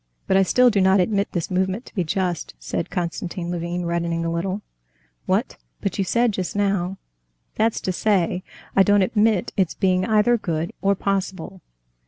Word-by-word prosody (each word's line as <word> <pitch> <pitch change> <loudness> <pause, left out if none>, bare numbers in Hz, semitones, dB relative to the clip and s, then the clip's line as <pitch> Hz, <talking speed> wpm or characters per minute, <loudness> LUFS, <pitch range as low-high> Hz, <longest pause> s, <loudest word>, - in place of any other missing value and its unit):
"But 190 - +1
I 195 - +6
still 250 +6 +4
do 200 -2 +2
not 190 +1 +5
admit 200 +2 +1
this 175 -1 -3
movement 190 +6 0
to - - -14
be 185 - 0
just," 175 - -2
said - - -4
Konstantin 175 0 -3
Levin, 175 0 -3
reddening 170 -1 -1
a 165 - -1
little. 185 +4 -2 0.6
"What! - - 0 0.2
But 200 - -3
you - - +3
said 235 +5 +2
just 185 -2 -4
now...." 195 -2 0 0.6
"That's 220 +1 +1
to 185 - -1
say, 185 -2 +1 0.3
I 195 - +6
don't 205 0 +5
admit 215 -2 +1
it's 185 -4 +1
being 185 -1 +2
either 220 +2 +3
good 165 -3 -2
or 200 0 +3
possible." 190 -1 -3
190 Hz, 175 wpm, -23 LUFS, 175-205 Hz, 0.6 s, I